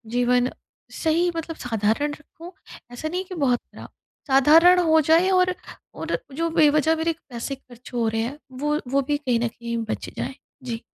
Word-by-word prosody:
जीवन 245 +1 +2 0.4
सही 335 +2 +1
मतलब 330 0 -4
साधारण 225 +5 0
रखूँ, 330 +3 -12 0.4
ऐसा 245 +6 -5
नहीं 360 +3 -2
कि 370 - -8
बहुत 260 -6 +2
खराब। - - -13 0.4
साधारण 315 +7 +6
हो 320 -2 +4
जाए 325 +5 +4
और 365 -1 +3 0.4
और - - -3 0.2
जो 330 +2 0
बेवजह 305 0 +4
मेरे 325 +1 0 0.2
पैसे 245 +3 -4
खर्च 250 -2 -16
हो 235 -2 0
रहे 225 0 0
हैं, 250 +6 -4
वो 295 +4 -1
वो 275 +2 +2
भी 295 - +1
कहीं 250 -5 0
न 235 - 0
कहीं 235 0 -5
बच - - -4
जाएँ। 265 - -4 0.3
जी। 235 -2 -5
290 Hz, 175 wpm, -23 LUFS, 245-325 Hz, 0.4 s, साधारण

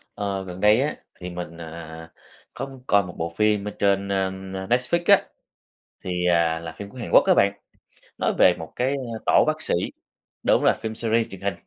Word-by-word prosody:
Ờ, 100 -2 -3
gần 90 0 -8
đây 105 +3 +5
á 145 +3 -1 0.2
thì 90 0 -8
mình, 85 -1 -7
à, - - -6
à, 85 - -8
à, 80 +1 -11 0.4
có 135 - -4
muốn 135 -2 -13
coi 100 0 +4
một 90 -2 -9
bộ 85 0 -3
phim 105 -1 +2
ở - - -3
trên, 100 0 +2
na, 95 -1 +1
ưm, 95 0 -6
na, 95 0 -5
Netflix 125 - +1
á. - - -7 0.8
Thì, 90 -1 -1
à, 85 -1 +2
là 85 0 -7
phim 100 - -7
của 130 - -14
Hàn 120 - -5
Quốc - - +8
á - - +7
bạn, 100 0 +3 0.6
nói - - 0
về 90 - +6
một 80 -1 -9
cái, 130 +2 0
a, 120 -5 -4
tổ - - +5
bác 155 0 0
sĩ, - - -1 0.7
đúng - - +3
rồi - - +5
phim 110 0 -4
series 115 0 +1
truyền 95 -1 -10
hình. 100 0 -1
100 Hz, 230 wpm, -24 LUFS, 90-110 Hz, 0.8 s, Quốc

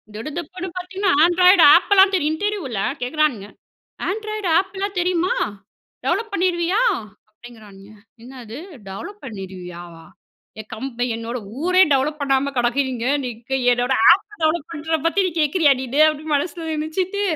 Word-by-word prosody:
திடுதிப்புன்னு 340 +9 -6
பாத்திங்கன்னா, 380 +2 -1
Android 360 +1 +5
app 365 +3 +3
லா 385 - +10
தெரியுன்ட்டு, 305 -5 +1 0.2
இன்டர்வியூல 270 - -4 0.2
கேட்குறானுங்க. 250 -6 -1 0.6
Android 430 -1 -3
app 385 +1 -5
லா 400 - 0
தெரியுமா? 360 0 +1 0.7
டெவலப் 445 +2 -1
பண்ணிருவியா? 360 +2 +1 0.5
அப்படிங்கிறானுங்க. 215 -3 -15 0.3
என்னது? 245 -2 -10 0.3
டெவலப் 400 - -9
பண்ணிடுவியாவா? 180 -6 -9 0.5
என் 215 - -10
கம் 225 +5 -5 0.3
என்னோட 230 +2 -5 0.2
ஊரே 365 +2 +3
டெவலப் 295 +3 0
பண்ணாம 275 0 +1
கெடக்குதிங்க. 245 0 0 0.2
நீங்க, 240 +1 -7 0.2
என்னோட 245 +2 0 0.2
ஆப் 390 - +3 0.2
டெவலப் 315 0 0
பண்றத 320 0 -2
பத்தி, 340 +4 +1
நீ - - -3
கேக்கிறியா? 300 0 +3
நீனு 265 +3 -2
அப்படின்னு, 305 0 -2
மனசில 330 +3 -3
நெனச்சிட்டு, 350 +6 -2
305 Hz, 130 wpm, -21 LUFS, 240-365 Hz, 0.7 s, லா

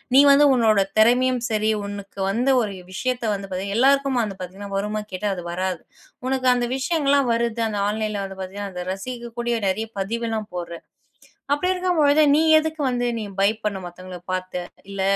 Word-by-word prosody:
"நீ 275 - +9
வந்து 290 +1 +6
உன்னோட 220 -5 +4 0.2
திறமையும் 245 +2 +4
சரி 215 0 +2
உனக்கு 200 -1 -8
வந்து 250 +6 +2
ஒரு 205 -2 -4 0.2
விஷயத்தை 250 +1 -1
வந்து 195 -1 -5
பார்த்தீங்கன்னா, 195 +3 -2
எல்லாருக்கும் 275 -1 +3
அது 195 -3 -5
பாத்தீங்கன்னா 195 +2 -7
வருமான்னு 210 +1 -3
கேட்டா 205 +3 -1
அது 175 - -6
வராது. 185 -1 -2 0.5
உனக்கு 260 -1 0
அந்த 245 -1 0
விஷயங்கள் 285 0 0
எல்லாம் 275 -4 +3
வருது. 235 0 -1
அந்த 205 -1 -3
ஆன்லைன்ல 215 -1 -2
வந்து 195 0 -9
பார்த்தீங்கன்னா, 195 +2 -6
அத 180 0 -4
ரசிக்கக்கூடிய 235 +2 -4
நெறைய 220 +4 -2
பதிவு 230 +5 -2
எல்லாம் 220 -2 -3
போடுற. 170 -1 -5 0.8
அப்படி 360 +6 +1
இருக்கும்பொழுது 320 -5 +3
நீ 295 - +5 0.2
எதுக்கு 315 0 -1
வந்து 245 -1 0
நீ - - -3 0.2
பயப்படணும் 200 -2 0
மத்தவங்கள 180 +1 -9
பாத்து. 185 -1 -3 0.3
இல்ல 195 -1 -4
220 Hz, 170 wpm, -23 LUFS, 195-255 Hz, 0.8 s, நீ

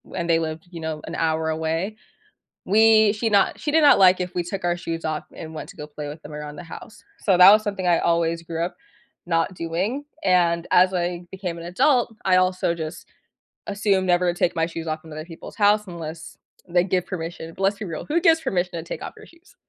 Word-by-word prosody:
and 170 -2 -3
they 165 - +4
lived, 160 +1 -5
you 170 - -8
know, 160 -1 -4
an 165 - -5
hour 160 0 0
away, 160 +6 -2 0.7
we 220 0 +5
she 225 +1 -1
not 200 -2 +2
she 295 - -2
did 320 +1 +4
not 285 -8 +6
like 185 -1 +6
if 180 0 -4
we 175 - 0
took 185 +2 -5
our 175 0 +1
shoes 165 -1 -5
off 155 -1 -2
and 160 0 -9
went - - -7
to - - -14
go 150 - -7
play 150 0 -7
with 150 +2 -8
them 150 - -10
around 150 0 -7
the - - -8
house. 170 +5 -11 0.2
So 190 -4 +2
that 185 +2 +10
was 215 +1 +5
something 195 -4 -3
I 170 -1 +4
always 170 0 +1
grew 165 0 -3
up 180 - -7 0.5
not 165 +1 0
doing 185 - -3 0.2
and 170 -2 +2
as 185 +1 +5
I 175 0 -2
became 185 -3 -5
an 170 - -8
adult, 245 - +2
I 185 -1 +4
also 185 -2 +1
just 160 0 -7 0.6
assumed 200 -2 +1
never 175 0 +2
to 175 - -11
take 175 - +1
my 165 - +1
shoes 165 -1 -7
off 155 0 -4
in 160 - -11
other 155 +1 -6
people's 165 -1 -11
house 210 0 +3
unless 165 -2 -8 0.3
they 175 +1 +2
give 185 -1 -1
permission, 165 -2 -6
but 195 - -6
let's 200 +1 +2
be 210 - -5
real, 165 -3 -6
who 325 +3 +1
gives 325 -2 +4
permission 180 - -1
to 170 -1 -5
take 170 - -7
off - - -7
your - - -13
shoes? 335 +8 -22
175 Hz, 235 wpm, -23 LUFS, 165-195 Hz, 0.7 s, that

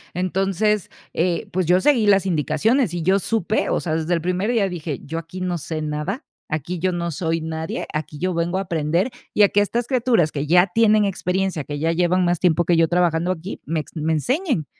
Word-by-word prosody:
entonces, 195 +3 0 0.2
eh, 170 0 0
pues, 185 0 0
yo 180 +1 +5
seguí 240 -4 +3
las 195 -1 +4
indicaciones 195 - +1
y 175 - -3
yo 190 +4 +3
supe, 215 +1 0
o - - +1
sea, 160 -3 -2
desde 160 +2 -1
el 165 - -2
primer 180 +5 -1
día 220 -5 +2
dije, 165 -5 -5
yo 165 +3 -4
aquí 165 +3 -9
no 180 -2 -2
sé 155 +1 -4
nada, 155 - -3 0.3
aquí 160 +3 -3
yo 185 +1 +1
no 170 -1 -2
soy 165 +1 -1
nadie, 160 0 -4
aquí 155 -1 -4
yo 185 +2 -1
vengo 170 +2 -1
a 195 - 0
aprender, 170 - 0 0.2
y 210 - +5
a 200 - +6
que 205 - +3
estas 235 +3 -1
criaturas 235 - +2
que 145 0 -3
ya 180 +3 +5
tienen 215 -2 +4
experiencia, 190 -3 -1
que 145 +1 -5
ya 160 +3 0
llevan 180 +2 +2
más 175 -1 +1
tiempo 175 -1 +2
que 175 - +3
yo 165 0 +4
trabajando 175 0 +1
aquí, 185 +2 -6
me 160 +1 -1
ex - - -15
me 160 +1 0
enseñen, 255 - 0
175 Hz, 220 wpm, -22 LUFS, 160-195 Hz, 0.3 s, a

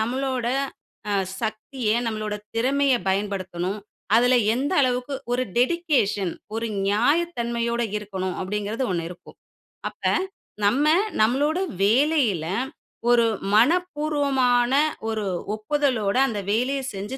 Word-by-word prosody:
நம்மளோட 255 +2 -1 0.6
அ - - +1 0.3
சக்திய 220 +2 -3 0.2
நம்மளோட 215 -1 -2 0.2
திறமையை 265 +2 +2
பயன்படுத்தணும்? 190 -1 -2 0.4
அதுல 245 +2 +5 0.2
எந்த 270 +4 -1
அளவுக்கு 255 +1 0 0.2
ஒரு 250 +1 +1
டெடிகேஷன், 250 - +1 0.2
ஒரு 225 +1 -1 0.2
நியாயத்தன்மையோட 235 -1 +1
இருக்கணும் 190 -3 -4
அப்டிங்கிறது 210 +5 -2
1 170 -2 -2
இருக்கும். 175 0 -13 0.5
அப்ப, - - -24 0.6
நம்ம 250 +9 +3 0.4
நம்மளோட 285 +9 +2 0.2
வேலையில 235 - +3 0.6
ஒரு 240 -1 +5 0.3
மனப்பூர்வமான 280 -3 +2 0.4
ஒரு 220 -1 -2 0.3
ஒப்புதலோட 235 -3 0
அந்த 220 -5 -3
வேலைய 250 +6 +1
செஞ்சு 205 +7 -5
235 Hz, 100 wpm, -24 LUFS, 210-275 Hz, 0.6 s, அதுல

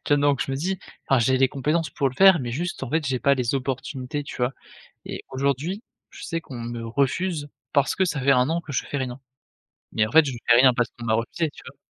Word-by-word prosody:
Tiens 145 0 +4
donc 145 -2 +2
je - - -6
me 135 - -1
dis: 185 +5 -2 0.3
«Enfin 135 - +4
j'ai 130 +3 +3
les 130 0 +4
compétences 150 +5 -1
pour 140 -2 0
le 130 - -10
faire 190 +1 +7
mais 120 -2 -4
juste 175 +2 -3
en 125 - -4
fait 160 -1 +1
j'ai 130 -1 0
pas 140 +2 +3
les 125 0 -1
opportunités» 135 +1 -3
tu - - -8
vois? 125 +1 0 0.5
Et - - -6
aujourd'hui 140 - -1 0.3
je - - -12
sais 165 -1 -3
qu'on 125 -3 -9
me 115 0 -5
refuse 145 +5 -1 0.2
parce 140 -2 +2
que 190 - +2
ça 150 -6 -2
fait 140 +1 +4
1 125 +1 +3
an 170 +1 0
que 155 -4 -9
je - - -1
fais 145 - -4
rien, 130 -1 -4 0.7
mais 110 -1 +2
en 110 - -9
fait, 160 0 +7
je 140 - -2 0.2
fais 120 - +6
rien 130 -1 +7
parce 120 -1 +1
qu'on 120 -1 -7
m'a 110 - +2
refusé, 135 +8 -1
tu - - -15
vois? - - -11
135 Hz, 255 wpm, -24 LUFS, 125-155 Hz, 0.7 s, faire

